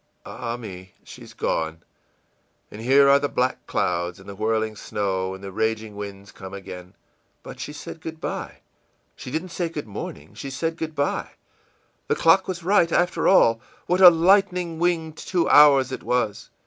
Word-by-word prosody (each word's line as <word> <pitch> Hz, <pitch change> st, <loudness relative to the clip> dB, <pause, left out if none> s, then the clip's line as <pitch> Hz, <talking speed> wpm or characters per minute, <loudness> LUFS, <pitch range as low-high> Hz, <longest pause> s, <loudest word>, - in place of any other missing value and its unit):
Ah, 120 Hz, -1 st, -5 dB
me, 95 Hz, -5 st, -10 dB
she's -, -, -13 dB
gone, 80 Hz, +1 st, -2 dB, 0.9 s
and 105 Hz, -, -9 dB
here 135 Hz, +4 st, +5 dB
are 140 Hz, 0 st, +6 dB
the 145 Hz, 0 st, -1 dB
black 125 Hz, +1 st, -1 dB
clouds 85 Hz, +1 st, -1 dB
and 95 Hz, -, -15 dB
the 100 Hz, -, -7 dB
whirling 110 Hz, +1 st, -1 dB
snow 95 Hz, -2 st, -3 dB
and 95 Hz, -, -13 dB
the 100 Hz, -, -7 dB
raging 110 Hz, +1 st, -2 dB
winds 100 Hz, -1 st, -8 dB
come 95 Hz, 0 st, -10 dB
again! 90 Hz, -2 st, -10 dB, 0.5 s
But -, -, -10 dB
she -, -, -5 dB
said 150 Hz, +2 st, -9 dB
good 160 Hz, 0 st, -7 dB
by. -, -, -5 dB, 0.5 s
She -, -, -9 dB
didn't 160 Hz, +7 st, -3 dB
say 170 Hz, 0 st, -3 dB
good 155 Hz, -3 st, -6 dB
morning, 80 Hz, -7 st, -8 dB
she 140 Hz, -, -7 dB
said 165 Hz, +5 st, -3 dB
good 160 Hz, -2 st, -5 dB
by!... 140 Hz, 0 st, -2 dB, 0.7 s
The -, -, +1 dB
clock 175 Hz, +4 st, +4 dB
was 180 Hz, -2 st, -5 dB
right, 180 Hz, -2 st, +3 dB
after 175 Hz, +2 st, +1 dB
all. 115 Hz, -11 st, +5 dB, 0.2 s
What 180 Hz, +2 st, +1 dB
a 180 Hz, -, +12 dB
lightning 180 Hz, -1 st, +2 dB
winged 165 Hz, -2 st, 0 dB
two 180 Hz, -2 st, -1 dB
hours 140 Hz, -3 st, +6 dB
it -, -, -5 dB
was! 120 Hz, -5 st, -1 dB
130 Hz, 175 wpm, -23 LUFS, 100-165 Hz, 0.9 s, a